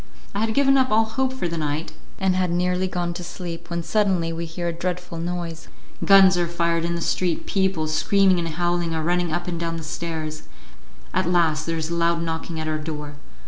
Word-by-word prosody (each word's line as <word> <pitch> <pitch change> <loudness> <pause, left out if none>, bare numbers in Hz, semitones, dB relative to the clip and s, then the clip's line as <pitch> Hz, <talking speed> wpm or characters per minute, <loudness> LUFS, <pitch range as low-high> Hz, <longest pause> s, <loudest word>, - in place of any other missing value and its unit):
I 200 - -2
had 220 0 0
given 275 -1 +5
up 260 0 +3
all 220 +1 +4
hope 260 +4 -1
for 260 -9 -2
the 165 -1 -3
night, 150 +1 -2 0.3
and 190 -1 +2
had 185 -1 +1
nearly 180 +2 +1
gone 175 -1 -2
to 175 +1 -6
sleep, 170 -1 -7
when 170 -1 -2
suddenly 185 -5 +1
we 170 +1 -3
hear 170 +1 -4
a - - -2
dreadful 180 0 -4
noise. 170 -1 -4 0.4
Guns 190 -2 +7
are 175 - +1
fired 170 -1 0
in 170 0 -1
the 170 - -3
street, 175 0 0
people, 190 -5 +1
screaming 185 +4 +3
and 170 - -1
howling, 175 0 0
are 160 - -1
running 175 0 +1
up 175 +2 -2
and 170 -2 -3
down 165 -1 -2
the 165 - -6
stairs; 155 -1 -4 0.7
at 185 -1 +1
last 160 -3 +2
there 165 0 -1
is 160 +1 -3
a - - 0
loud 170 0 +2
knocking 160 0 -3
at 155 - -3
our 155 0 -1
door. 150 -2 -6
170 Hz, 220 wpm, -23 LUFS, 165-180 Hz, 0.7 s, Guns